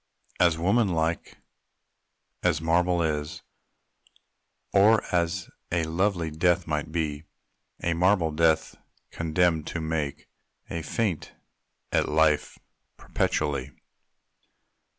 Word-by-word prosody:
As 85 -2 +4
woman 100 +7 +2
like 80 -2 -2 1.0
as 85 -3 +2
marble 85 +2 +2
is, 75 -1 -3 1.3
Or 105 +2 +5
as 85 +1 0 0.2
a 85 -1 +1
lovely 85 0 0
death 90 +3 +2
might 75 -1 -3
be 75 -2 -2 0.6
A 85 - +1
marble 90 -1 +2
death 80 0 +2 0.4
condemned 80 -1 +1
to 85 - -3
make 80 -3 -3 0.4
A 85 - -3
feint 90 +2 -2 0.6
at - - +1
life 75 -1 +2 0.4
perpetually. 70 -2 -1
80 Hz, 95 wpm, -26 LUFS, 80-90 Hz, 1.3 s, Or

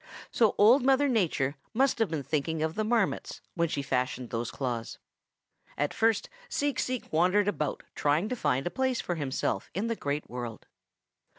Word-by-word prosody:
So 225 -3 +3
Old 230 +7 +7
Mother 270 +2 +4
Nature 160 - +1 0.2
must 265 0 +2
have 225 - +2
been 155 -3 -2
thinking 155 +2 -1
of 160 0 -1
the 215 - -1
Marmots 220 -2 0
when 170 -1 +1
she 140 - -2
fashioned 125 -2 -1
those 115 0 -2
claws. 120 -4 -4 0.8
"At 145 0 0
first 225 -2 +2 0.2
Seek 285 - 0
Seek 255 -8 -3
wandered 185 +5 +3
about 150 -8 -1
trying 150 +7 +1
to 250 - -1
find 135 - 0
a 175 - -1
place 260 -2 0
for 175 - -2
himself 135 - -2
in 215 +5 -1
the 230 - 0
Great 145 -5 -3
World. 120 -3 -6
170 Hz, 175 wpm, -29 LUFS, 140-225 Hz, 0.8 s, Old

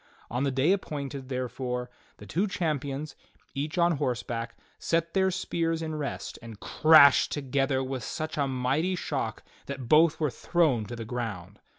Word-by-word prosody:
On 125 +2 -1
the 140 - +2
day 135 +6 +2
appointed, 140 -8 -3
therefore, 125 -1 -3 0.3
the 105 - -11
two 180 - 0
champions, 145 -5 -2 0.4
each 145 +5 -3
on 170 -2 +3
horseback, 120 -2 -3 0.2
set 165 0 0
their 190 -1 +3
spears 165 -3 -1
in 155 -1 -3
rest 150 -2 -4
and 115 -3 -10
crashed 155 -3 +6
together 135 -1 0
with 130 -1 -4
feuch 155 +4 -4
a - - 0
mighty 135 +8 0
shock - - -3 0.2
that 135 -3 -5
both 155 +4 +5
were 150 -4 +1
thrown 150 -11 +1
to 120 - -6
the 115 -1 -6
ground. 105 -5 -5
140 Hz, 160 wpm, -28 LUFS, 125-160 Hz, 0.4 s, crashed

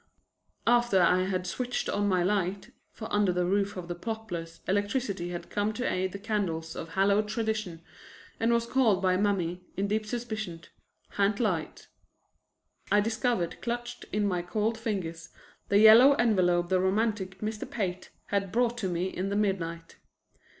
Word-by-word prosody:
After 240 -4 +4
I 180 +1 +4
had 185 -1 -2
switched 245 +6 -2
on 205 0 0
my 185 -3 +2
light 195 +3 -1 0.2
(for 220 - -7
under 205 -2 +3
the 180 0 0
roof 200 +2 0
of 175 -2 -6
the 175 - -3
Poplars 175 -4 -6
electricity 205 -2 -1
had 175 -1 -7
come 205 +1 0
to 250 +3 -2
aid 185 0 -1
the 200 - -6
candles 195 -6 -2
of 165 - -6
hallowed 200 +3 +3
tradition, 215 -6 -2 0.6
and 230 +1 +2
was 235 0 +2
called 235 -6 +3
by 185 -1 +2
Mammy, 185 -3 0 0.2
in 200 +1 0
deep 215 +1 -1
suspicion, 220 -7 -4 0.5
"ha'nt 200 +1 +1
light") 185 -9 -2 1.0
I 205 - +5
discovered 220 -4 -1
clutched 240 0 -4
in 210 0 +1
my 180 -3 0
cold 215 +5 -1
fingers 180 -7 -4 0.4
the 200 - +4
yellow 225 +6 +9
envelope 180 -9 +2
the 185 -1 +3
romantic 190 0 0
Mr. 215 0 -4
Pate 185 -5 -3 0.2
had 200 -2 -1
brought 240 +1 +1
to 195 - -1
me 175 +1 -1
in 190 +1 -3
the 200 - -1
midnight. 170 -5 -2
200 Hz, 160 wpm, -28 LUFS, 180-220 Hz, 1.0 s, yellow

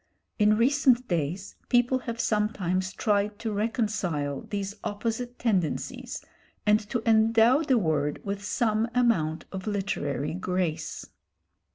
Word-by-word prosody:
In 210 0 +5
recent 255 0 +3
days 175 +3 -2
people 245 +1 +3
have 235 -2 -6
sometimes 190 -4 0
tried 205 0 0
to 225 -1 -3
reconcile 205 - -1
these 200 -1 -3
opposite 230 +4 -3
tendencies 190 -9 -2 0.4
and 210 0 +5
to 240 -3 -2
endow 225 +4 +5
the 270 -5 +2
word 155 -7 0
with 200 0 -3
some 220 +1 +1
amount 165 -11 +1
of 190 +1 -6
literary 155 -8 -2
grace. 180 -3 -2
210 Hz, 120 wpm, -27 LUFS, 185-230 Hz, 0.4 s, In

